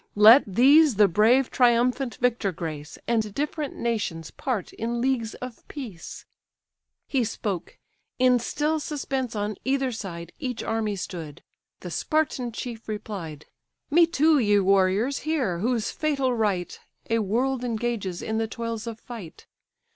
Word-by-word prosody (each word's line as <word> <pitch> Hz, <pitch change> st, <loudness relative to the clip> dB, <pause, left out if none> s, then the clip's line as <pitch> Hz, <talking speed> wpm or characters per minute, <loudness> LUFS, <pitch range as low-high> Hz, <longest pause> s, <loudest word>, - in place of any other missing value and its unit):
Let 220 Hz, +6 st, +9 dB
these 275 Hz, -, +5 dB
the 205 Hz, 0 st, +6 dB
brave 225 Hz, +8 st, +3 dB
triumphant 245 Hz, +1 st, +2 dB
victor 235 Hz, -5 st, 0 dB
grace, 155 Hz, -3 st, -6 dB
And 220 Hz, -3 st, 0 dB
different 295 Hz, 0 st, -3 dB
nations 200 Hz, -9 st, -2 dB
part 245 Hz, -8 st, -3 dB
in 235 Hz, +1 st, -3 dB
leagues 240 Hz, -3 st, 0 dB
of 250 Hz, -2 st, -9 dB
peace." 230 Hz, -, -8 dB, 0.8 s
He 265 Hz, -3 st, +1 dB
spoke: 205 Hz, -5 st, -4 dB, 0.4 s
in 250 Hz, -1 st, +4 dB
still 300 Hz, +6 st, -1 dB
suspense 270 Hz, -5 st, -3 dB
on 210 Hz, 0 st, -2 dB
either 265 Hz, -1 st, 0 dB
side 170 Hz, -7 st, -7 dB
Each 250 Hz, -3 st, -4 dB
army 220 Hz, -2 st, -1 dB
stood: 165 Hz, -5 st, -7 dB, 0.4 s
the 180 Hz, -, -7 dB
Spartan 280 Hz, -, 0 dB
chief 230 Hz, 0 st, -7 dB
replied: 185 Hz, -8 st, -6 dB, 0.5 s
"Me 335 Hz, +2 st, +6 dB
too, 315 Hz, -2 st, +3 dB
ye 205 Hz, -4 st, +3 dB
warriors, 195 Hz, +6 st, +2 dB
hear, 265 Hz, -, -1 dB
whose 230 Hz, +1 st, 0 dB
fatal 275 Hz, -4 st, 0 dB
right 205 Hz, -6 st, -1 dB, 0.3 s
A 230 Hz, -, +3 dB
world 245 Hz, +5 st, 0 dB
engages 225 Hz, -6 st, -2 dB
in 220 Hz, 0 st, -1 dB
the 225 Hz, -, 0 dB
toils 230 Hz, 0 st, -5 dB
of 225 Hz, -1 st, -6 dB
fight. 220 Hz, -11 st, -10 dB
230 Hz, 140 wpm, -25 LUFS, 205-260 Hz, 0.8 s, Let